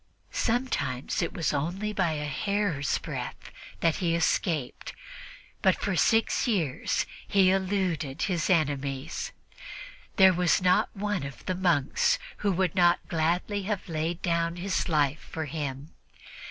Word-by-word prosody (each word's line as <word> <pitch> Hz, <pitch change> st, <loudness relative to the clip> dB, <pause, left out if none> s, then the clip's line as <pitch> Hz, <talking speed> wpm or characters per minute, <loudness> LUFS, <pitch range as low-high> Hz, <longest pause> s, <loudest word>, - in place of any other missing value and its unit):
Sometimes 150 Hz, -, -1 dB
it 170 Hz, -, -1 dB
was 160 Hz, -4 st, -1 dB
only 180 Hz, +9 st, -2 dB
by 185 Hz, -6 st, +1 dB
a 150 Hz, -1 st, -3 dB
hair's 175 Hz, -2 st, 0 dB
breadth -, -, -6 dB, 0.3 s
that 165 Hz, -2 st, +2 dB
he 170 Hz, -2 st, +1 dB
escaped, 165 Hz, -4 st, -1 dB, 0.7 s
but -, -, +4 dB
for -, -, -2 dB
six 225 Hz, +2 st, +2 dB
years 170 Hz, -, 0 dB, 0.2 s
he 190 Hz, -2 st, +4 dB
eluded 185 Hz, -7 st, -1 dB
his 175 Hz, -5 st, 0 dB
enemies. 140 Hz, -4 st, 0 dB, 0.8 s
There 190 Hz, -2 st, +7 dB
was 180 Hz, +1 st, +3 dB
not 180 Hz, -1 st, +3 dB
one 205 Hz, -2 st, -1 dB
of 140 Hz, 0 st, -8 dB
the 185 Hz, -, 0 dB
monks 175 Hz, -7 st, +2 dB, 0.2 s
who 205 Hz, -, 0 dB
would 185 Hz, -2 st, +1 dB
not 175 Hz, -2 st, +3 dB
gladly 175 Hz, +5 st, 0 dB
have 205 Hz, -3 st, -2 dB
laid 165 Hz, +1 st, -2 dB
down 170 Hz, -1 st, 0 dB
his 185 Hz, +1 st, -1 dB
life 150 Hz, -2 st, +2 dB
for 160 Hz, -1 st, -3 dB
him. 145 Hz, -1 st, -5 dB
170 Hz, 135 wpm, -28 LUFS, 150-190 Hz, 0.8 s, There